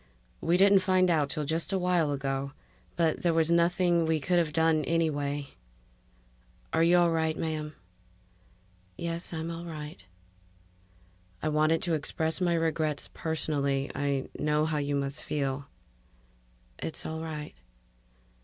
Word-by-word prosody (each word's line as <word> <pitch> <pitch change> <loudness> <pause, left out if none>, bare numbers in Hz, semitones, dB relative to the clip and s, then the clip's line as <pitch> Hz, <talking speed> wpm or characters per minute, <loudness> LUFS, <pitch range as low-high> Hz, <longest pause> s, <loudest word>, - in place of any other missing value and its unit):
We 170 +2 +3
didn't 195 +1 +6
find 185 -1 +3
out 150 -4 +2
till 150 0 -2
just 165 +5 -1
a 195 - +1
while 180 -4 +2
ago 135 0 -2 0.4
but 165 -2 +1
there 170 -2 +2
was 165 0 +3
nothing 170 0 +3
we 160 -1 +2
could 175 +4 +2
have 165 -3 0
done 160 -1 +3
anyway... 145 -4 0 1.2
Are 160 - +3
you 170 +2 +5
all 175 -1 +4
right, 160 -1 0
ma'am?" 155 -1 -3 1.2
"Yes. 170 0 -4
I'm 165 0 -3
all 170 +1 -6
right." 150 - -7 1.4
"I - - +1
wanted 155 +2 +2
to 175 - 0
express 160 +2 -1
my 175 -2 +2
regrets 160 -3 -1
personally. 140 -4 -1
I 140 -2 -1
know 150 +1 +2
how 155 -1 0
you 145 0 -1
must 140 +1 -2
feel." 140 -1 -2 1.1
"It's 160 - -5
all 160 0 -4
right." 155 -2 -5
160 Hz, 140 wpm, -29 LUFS, 150-170 Hz, 1.4 s, didn't